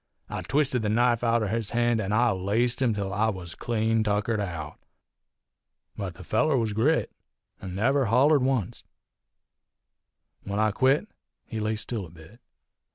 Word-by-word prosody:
I - - -4
twisted 135 -4 +1
his 105 - 0
knife 120 +1 +2
outer 115 -2 +2
his 110 -1 -2
hand, 120 -1 +2
an' 100 -1 -3
I 120 +2 +3
laced 105 +7 0
him 125 -3 +3
till 100 -1 -3
I 110 +4 +2
was 90 -5 -6
clean 115 -1 0
tuckered 105 +1 0
out. 85 -6 -5 1.2
But 95 -4 -5
the 95 - -11
feller 155 - +2
was 110 -3 0
grit, 135 +10 +1 0.5
an' 95 -1 -6
never 135 +7 +2
hollered 135 +6 +4
oncet. 130 -6 -1 1.6
When 100 0 -4
I 110 0 +2
quit 135 - +2 0.4
he 110 - -5
laid 110 +1 -1
still 110 -3 -4
a - - -16
bit. 85 +7 -16
110 Hz, 160 wpm, -26 LUFS, 100-120 Hz, 1.6 s, hollered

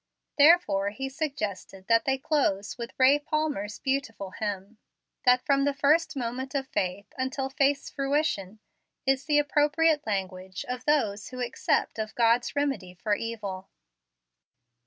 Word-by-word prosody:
Therefore 285 - +5
he 270 +6 -5
suggested 215 - -4
that 230 +1 +3
they 270 0 +1
close 205 -9 0
with 235 -1 -6
Ray 270 +2 +5
Palmer's 295 -9 -2
beautiful 260 -8 -3
hymn, 205 +1 -5 0.5
that 250 0 +4
from 275 -1 +3
the 285 0 +1
first 300 +4 +2
moment 255 +1 -4
of 270 -1 0
faith, 185 -1 -3
until 265 +1 -2
faith's 275 +1 +1
fruition, 275 -8 -1 0.5
is 270 +1 +1
the 300 -1 +3
appropriate 295 0 +2
language 190 -2 -3
of 250 0 -5
those 215 -9 +1
who 255 - -8
accept 240 -2 0
of 215 0 -4
God's 235 +2 +2
remedy 270 -11 -2
for 205 +3 -1
evil. 205 -4 -4
255 Hz, 135 wpm, -27 LUFS, 205-285 Hz, 0.5 s, Therefore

